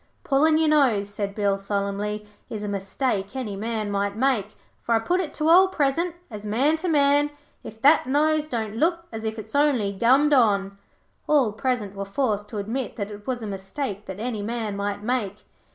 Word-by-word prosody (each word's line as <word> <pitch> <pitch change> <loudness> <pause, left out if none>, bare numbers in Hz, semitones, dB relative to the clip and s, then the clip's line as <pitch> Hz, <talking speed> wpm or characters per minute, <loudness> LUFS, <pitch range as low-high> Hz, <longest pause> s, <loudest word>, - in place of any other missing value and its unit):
'Pullin' 310 +3 +3
your 320 0 +2
nose,' 230 -10 +2
said 200 -1 -3
Bill, 200 -2 +1
solemnly, 200 +1 -2 0.2
'is 210 -2 -5
a - - -3
mistake 200 +1 -2
any 235 -7 -3
man 215 0 -3
might 200 0 -1
make, 220 -4 0 0.2
for 230 - +1
I - - +3
put 350 +11 0
it 330 - -4
to 310 - 0
all 365 +4 +7
present, 330 0 0 0.2
as 210 -1 -7
man 250 +9 +2
to 360 - -4
man, 290 -2 +3 0.3
if 220 - -10
that 285 -2 +5
nose 305 +2 +2
don't 220 -4 -3
look 335 +4 +1
as 225 -1 -6
if 220 0 -3
it's 220 0 -9
only 275 -9 +2
gummed 265 +8 +4
on.' 200 -6 +2 0.5
All 280 -8 +3
present 225 -4 -2
were 200 - -3
forced 210 -1 -1
to 220 - -6
admit 225 +5 -3
that 205 -1 -4
it 205 0 -11
was 245 -3 -2
a - - -3
mistake 200 +2 -5
that 190 +1 -7
any 225 -2 -3
man 220 -1 -3
might 200 0 -3
make. 215 -4 -2
225 Hz, 195 wpm, -24 LUFS, 205-280 Hz, 0.5 s, all